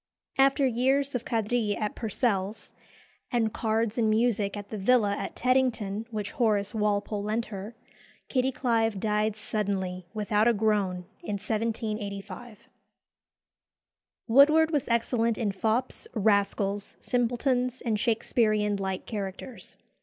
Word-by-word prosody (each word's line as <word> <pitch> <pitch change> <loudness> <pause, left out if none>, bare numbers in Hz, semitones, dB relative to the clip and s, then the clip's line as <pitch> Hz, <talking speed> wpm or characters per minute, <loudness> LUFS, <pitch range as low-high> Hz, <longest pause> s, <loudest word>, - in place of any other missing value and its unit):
After 275 +1 +4
years 265 +3 +1
of 245 -2 -3
quadrille 225 -2 0
at 210 -1 -2
Purcell's, 210 -2 -2 0.6
and 225 -4 +1
cards 225 0 0
and 220 -2 +3
music 215 -2 +1
at 205 0 -8
the 215 - -5
villa 205 -1 +3
at 195 - -5
Teddington 230 -5 0
which 210 -3 -4
Horace 210 -4 +1
Walpole 210 -1 0
lent 215 +3 -1
her, 200 +4 -7 0.5
Kitty 260 0 +1
Clive 225 -5 0
died 210 +1 0
suddenly, 190 -4 -3
without 215 0 +1
a 235 - +4
groan, 200 -4 0 0.2
in 210 - -4
1785. 215 0 -4 1.6
Woodward 305 +6 +6
was 290 -4 0
excellent 230 -1 +1
in 220 -5 0
fops, 220 +6 -1
rascals, 200 -1 +1
simpletons, 245 +1 0
and 220 -3 -1
Shakesperean 215 -3 +1
light 190 -1 -3
characters. 205 +3 -6
220 Hz, 120 wpm, -28 LUFS, 205-240 Hz, 1.6 s, Woodward